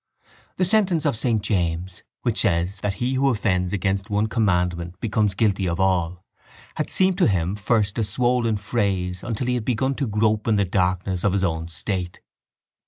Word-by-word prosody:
The 185 - +2
sentence 185 -5 +2
of 145 - +2
saint 110 -2 0
James 90 -3 -1 0.2
which 120 -3 +1
says 90 0 0
that 100 -1 -2
he 125 +5 -1
who 135 +1 +2
offends 95 -6 0
against 100 +1 -1
one 105 +1 +1
commandment 90 -6 0
becomes 105 -3 0
guilty 100 -3 +1
of 85 +1 -2
all 90 -1 0 0.5
had - - -3
seemed 190 0 +2
to 180 - +5
him 95 -2 0
first 105 0 0
a - - +2
swollen 120 0 +1
phrase 95 -4 -1
until 120 +1 -3
he 125 - 0
had 120 -3 -2
begun 130 +2 0
to 135 -1 -2
grope 105 0 +1
in 110 - +3
the 100 -1 +2
darkness 90 -1 0
of 100 - +2
his 100 -1 0
own 80 -3 -1
state. 90 +2 -4
100 Hz, 180 wpm, -23 LUFS, 90-115 Hz, 0.5 s, to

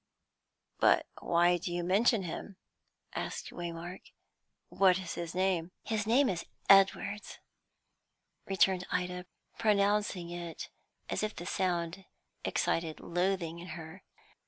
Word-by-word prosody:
"But - - +5
why 175 +1 +3
do 175 - -4
you 175 0 -1
mention 205 +4 +3
him?" 185 +3 -6 0.6
asked - - -4
Waymark. 175 +1 -6 0.7
"What 185 -2 +4
is 185 -2 -5
his 170 0 -5
name?" 185 -2 +1
"His 215 -1 -1
name 260 +5 +5
is 175 -6 -1 0.2
Edwards," 195 +1 +4 1.1
returned 190 -1 +2
Ida, 180 0 -2 0.3
pronouncing 205 -4 +2
it 175 -1 -6 0.4
as - - -1
if 215 0 -2
the 175 - -7
sound 180 -1 -1 0.4
excited 165 -2 0
loathing 175 -1 -1
in 175 - -9
her. 160 +3 -9
180 Hz, 115 wpm, -32 LUFS, 170-195 Hz, 1.1 s, But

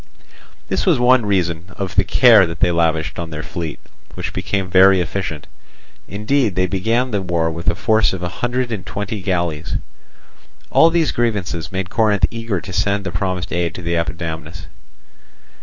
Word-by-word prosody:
This - - -1
was 175 -7 +3
one 125 -2 +4
reason 85 -4 0
of 95 -2 -4
the - - +4
care 115 -7 +6
that 85 0 -7
they 90 -2 +3
lavished 80 -1 0
on 85 -1 -4
their 75 -1 -6
fleet, 80 0 -5 0.4
which - - -5
became 95 -2 -2
very 95 +1 +6
efficient; 90 -3 -3 0.6
indeed 105 +1 0
they 95 - +2
began 115 +7 0
the 100 -2 0
war 85 -3 0
with 85 +3 -2
a 85 - -1
force 110 +2 +2
of 95 -2 -5
a - - -1
hundred 120 0 -1
and 105 -5 -4
twenty 105 0 -5
galleys. 85 -4 -2 1.0
All 165 - +6
these 165 -2 +1
grievances 100 -8 -2
made 95 -1 -4
Corinth 110 -3 +3
eager 115 -4 -3
to 95 +1 -9
send 100 +2 0
the 95 - -4
promised 95 -1 -3
aid 85 -1 -1
to 90 - -7
Epidamnus. 80 -2 -4
95 Hz, 170 wpm, -19 LUFS, 85-110 Hz, 1.0 s, care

